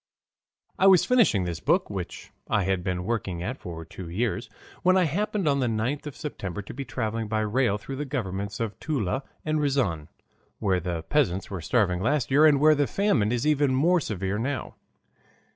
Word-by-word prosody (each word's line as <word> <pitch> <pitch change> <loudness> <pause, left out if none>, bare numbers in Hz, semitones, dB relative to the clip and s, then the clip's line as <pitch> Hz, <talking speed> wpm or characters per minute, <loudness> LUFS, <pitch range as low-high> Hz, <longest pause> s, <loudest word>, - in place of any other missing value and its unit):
I 190 - +6
was 190 -3 +6
finishing 230 - +4
this 85 -2 -3
book, - - +2
which - - -6 0.2
I 105 - +2
had 95 -1 0
been 90 -1 -2
working 95 -6 -2
at 125 +8 -4
for 80 -2 -7
two 85 +1 -9
years, 110 +4 -2 0.3
when 185 +1 +4
I 185 - +4
happened 195 +3 -1
on 140 -1 +3
the 125 - +1
9th 120 +7 -1
of 145 - -7
September 105 - -5
to - - -9
be 140 - -5
traveling 115 -3 -3
by 110 0 0
rail 110 0 +1
through 135 +6 -7
the 145 - -3
governments 100 -7 -3
of 110 -4 -3
Toula 130 - -1 0.2
and 155 0 +1
Riazan, 125 - 0 0.5
where 95 -3 +1
the 85 -2 -3
peasants 100 - 0
were 95 -3 -4
starving 90 -1 +1
last 140 +2 0
year 150 +3 +7
and 145 -2 +4
where 155 +2 +6
the 145 -2 +1
famine 195 - +1
is 120 +2 0
even 145 -3 +3
more 170 +7 +4
severe 100 - -2
now. 130 +3 -3
115 Hz, 195 wpm, -26 LUFS, 95-145 Hz, 0.5 s, year